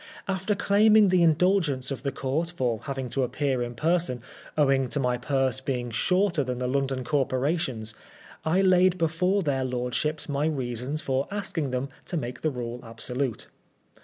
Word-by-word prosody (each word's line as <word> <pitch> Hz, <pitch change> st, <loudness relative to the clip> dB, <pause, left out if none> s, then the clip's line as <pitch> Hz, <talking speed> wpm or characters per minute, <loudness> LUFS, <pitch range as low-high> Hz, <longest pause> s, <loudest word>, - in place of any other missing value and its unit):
After 195 Hz, +2 st, 0 dB
claiming 210 Hz, +1 st, +5 dB
the 180 Hz, -1 st, +4 dB
indulgence 160 Hz, -5 st, +2 dB
of 130 Hz, -3 st, -4 dB
the 140 Hz, -, -2 dB
Court 140 Hz, +6 st, -2 dB
for 125 Hz, -9 st, -1 dB
having 135 Hz, -2 st, -3 dB
to 135 Hz, +4 st, -1 dB
appear 130 Hz, 0 st, 0 dB
in 120 Hz, 0 st, -4 dB
person, 160 Hz, -4 st, 0 dB, 0.3 s
owing 135 Hz, -3 st, +3 dB
to 130 Hz, -, 0 dB
my 125 Hz, -2 st, +1 dB
purse 135 Hz, -1 st, 0 dB
being 125 Hz, -3 st, -2 dB
shorter 180 Hz, -, +2 dB
than 125 Hz, -1 st, -3 dB
the 125 Hz, -, -2 dB
London 135 Hz, 0 st, 0 dB
Corporation's, 130 Hz, -4 st, 0 dB, 0.5 s
I 170 Hz, +4 st, +2 dB
laid 185 Hz, -1 st, +4 dB
before 180 Hz, +4 st, +1 dB
their 135 Hz, -4 st, 0 dB
lordships 125 Hz, +4 st, -1 dB
my 145 Hz, +1 st, 0 dB
reasons 130 Hz, 0 st, -2 dB
for 135 Hz, +1 st, 0 dB
asking 195 Hz, -8 st, -3 dB
them 130 Hz, +2 st, -2 dB, 0.2 s
to 175 Hz, -, -3 dB
make 125 Hz, -4 st, -5 dB
the 155 Hz, -, +1 dB
rule 120 Hz, -3 st, -5 dB
absolute. 120 Hz, +2 st, -2 dB
140 Hz, 160 wpm, -26 LUFS, 125-170 Hz, 0.5 s, claiming